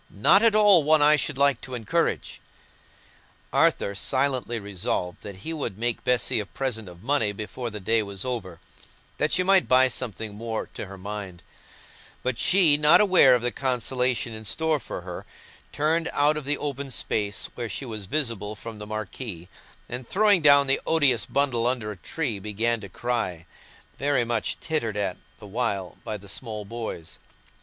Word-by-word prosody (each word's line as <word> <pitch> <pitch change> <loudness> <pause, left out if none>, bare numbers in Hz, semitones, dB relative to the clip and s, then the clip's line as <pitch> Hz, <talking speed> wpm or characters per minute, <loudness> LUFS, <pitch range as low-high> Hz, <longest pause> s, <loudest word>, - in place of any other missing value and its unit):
"Not 105 - +4
at 225 -2 +4
all 205 -5 +8
one 155 0 +4
I 150 +1 +6
should 150 -2 -1
like 140 -3 +2
to 130 -1 -7
encourage." 115 -4 -1 1.1
Arthur 100 - +2
silently 130 +1 0
resolved 95 -3 -3
that 100 -2 -8
he 165 - -3
would 140 -11 -4
make 120 +1 -2
Bessy 125 -3 +1
a 105 - -3
present 110 -7 -4
of 90 +2 -14
money 120 -5 +1
before 110 +4 -6
the 105 -1 -7
day 110 +4 +1
was 100 0 -6
over, 95 -9 -4 0.6
that 150 - +1
she 185 - +3
might 190 0 +4
buy 130 0 +5
something 110 -4 -5
more 110 +1 -4
to - - -6
her 95 0 -10
mind; 95 -2 -7 0.8
but 125 -2 -2
she, 175 -6 +5
not 150 +1 +6
aware 185 -11 +6
of 120 - -2
the 120 - 0
consolation 125 -1 -1
in 110 0 -8
store 160 +7 0
for - - -7
her, 90 0 -7 0.5
turned 160 +3 +1
out 145 +1 +3
of 150 -2 -5
the 145 +1 +1
open 140 -1 -4
space, 105 -5 -2
where 120 -2 -5
she 135 - -5
was 110 -5 -6
visible 115 -8 -1
from 110 0 -9
the 105 - -7
marquee, 105 -3 -6 0.4
and 125 0 -6
throwing 205 -2 +4
down 140 -2 +6
the 135 0 +1
odious 145 -7 +3
bundle 130 -4 +1
under 120 -4 -1
a - - -7
tree, 120 - -3
began 110 +3 -1
to 100 - -9
cry—very 120 - -3
much 115 -1 -2
tittered 115 -10 -2
at 100 -3 -2 0.2
the 110 - -13
while 100 -4 -3
by 105 - -4
the 100 0 -15
small 105 0 -5
boys. 110 -7 -7
120 Hz, 175 wpm, -25 LUFS, 105-140 Hz, 1.1 s, all